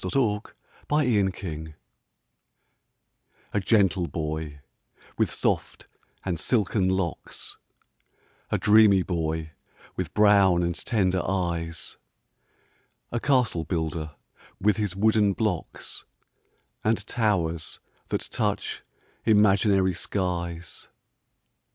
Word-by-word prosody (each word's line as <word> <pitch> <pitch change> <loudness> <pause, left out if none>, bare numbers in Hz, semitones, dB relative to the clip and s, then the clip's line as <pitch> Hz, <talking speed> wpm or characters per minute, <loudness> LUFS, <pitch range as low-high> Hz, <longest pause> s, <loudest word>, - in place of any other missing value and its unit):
THE - - -3
CASTLE 110 -7 +1 0.5
BUILDER 95 - 0 1.8
A 105 - +2
gentle 95 -3 +2
boy, 75 -2 -4 0.5
with - - +1
soft - - -2 0.4
and 90 -4 -1
silken 100 -5 +1
locks 95 -3 -3 0.9
A - - +1
dreamy 105 -3 +6
boy, 80 -3 -2 0.4
with 90 -4 -4
brown 100 -4 +5
and 85 0 0
tender 95 -2 0
eyes, 85 -3 -3 1.1
A 120 - -1
castle 125 - +2
builder, 80 -2 -3 0.4
with 105 +2 +2
his 105 -4 -1
wooden 105 0 +3
blocks, 100 -6 -3 0.8
And 110 -2 +1
towers 90 -10 -1 0.3
that - - -1
touch - - -1 0.4
imaginary 100 -3 +4
skies. 85 -2 -3
95 Hz, 90 wpm, -26 LUFS, 85-105 Hz, 1.8 s, dreamy